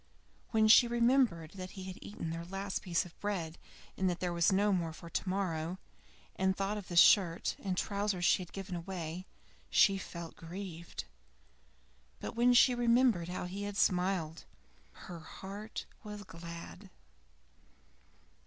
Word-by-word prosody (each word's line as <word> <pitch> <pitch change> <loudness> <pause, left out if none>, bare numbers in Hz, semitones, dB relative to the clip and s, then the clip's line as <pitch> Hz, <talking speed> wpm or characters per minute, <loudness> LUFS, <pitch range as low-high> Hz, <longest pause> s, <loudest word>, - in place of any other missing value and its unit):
When 220 -2 +4
she 235 +2 +8
remembered 235 - +2
that 185 -1 -8
he 190 - -5
had 185 0 -7
eaten 170 -5 -5
their 165 +1 -4
last 195 +2 -4
piece 175 -1 0
of 175 - -13
bread 175 -6 -3 0.4
and 190 -1 +1
that 175 0 -2
there 180 -1 -1
was 170 +3 +3
none 190 -4 +2
for 165 +1 -11
tomorrow, 185 -3 -1 0.6
and 190 0 +1
thought 200 +2 -1
of 200 - -10
the 175 - -5
shirt 170 -1 +5
and 190 -3 -2
trousers 200 -3 0
she 185 - +4
had 175 - -9
given 195 -2 -5
away, 175 0 -5 0.4
she 195 -1 +5
felt 170 -3 -7
grieved; 170 0 -7 1.2
but - - -6
when 245 +1 +4
she 250 +1 +7
remembered 235 -7 +3
how 180 - -3
he 190 +3 -5
had 205 0 -4
smiled, 180 -4 +1 0.6
her 175 -2 -7
heart 195 +6 -7 0.2
was 210 -1 -7
glad. 170 +2 -9
190 Hz, 145 wpm, -33 LUFS, 170-205 Hz, 1.2 s, she